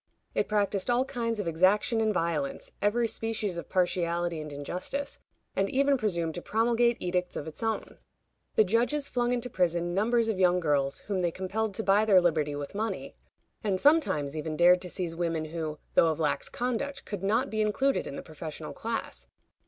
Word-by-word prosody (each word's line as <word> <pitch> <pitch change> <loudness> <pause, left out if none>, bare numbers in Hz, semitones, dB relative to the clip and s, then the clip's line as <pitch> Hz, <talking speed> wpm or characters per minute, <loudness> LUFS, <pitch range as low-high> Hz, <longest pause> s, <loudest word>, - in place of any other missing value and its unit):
It - - 0
practiced 200 -1 +1
all 245 +2 +3
kinds 230 -4 -2
of 200 - -2
exaction 190 +7 +3
and 220 -1 +2
violence, 165 -7 -2
every 225 +4 +2
species 215 -5 -2
of - - -9
partiality 175 -2 0
and 150 -1 -7
injustice, 180 - -4 0.4
and 195 +1 +1
even 275 +1 +3
presumed 170 -9 -1
to 175 - -5
promulgate 235 +3 +2
edicts 180 0 -1
of - - -4
its 160 +6 -7
own. 225 -1 -3 0.6
The 215 - +6
judges 245 +8 +1
flung 245 -1 0
into 245 0 -1
prison 175 -4 0
numbers 230 +4 +2
of 215 -4 -1
young 180 -1 +4
girls, 140 -4 0
whom 200 -2 -2
they 175 -1 +2
compelled 195 +4 -2
to 220 - -2
buy 205 +2 +4
their 195 -4 +6
liberty 155 -4 +1
with 145 -1 -6
money, 220 +2 -3 0.5
and 195 -3 0
sometimes 190 - +3
even 155 0 -3
dared 180 +1 +6
to 180 - -5
seize 175 -2 -3
women 165 -2 -1
who, 155 -1 -4 0.2
though - - +5
of 160 -1 0
lax 150 -2 0
conduct, 255 +3 -3
could 205 -3 -5
not 205 +3 +1
be 215 0 0
included 265 +6 +1
in 140 - -6
the - - -6
professional 155 -1 -7
class. 225 +8 -4
190 Hz, 185 wpm, -29 LUFS, 165-225 Hz, 0.6 s, The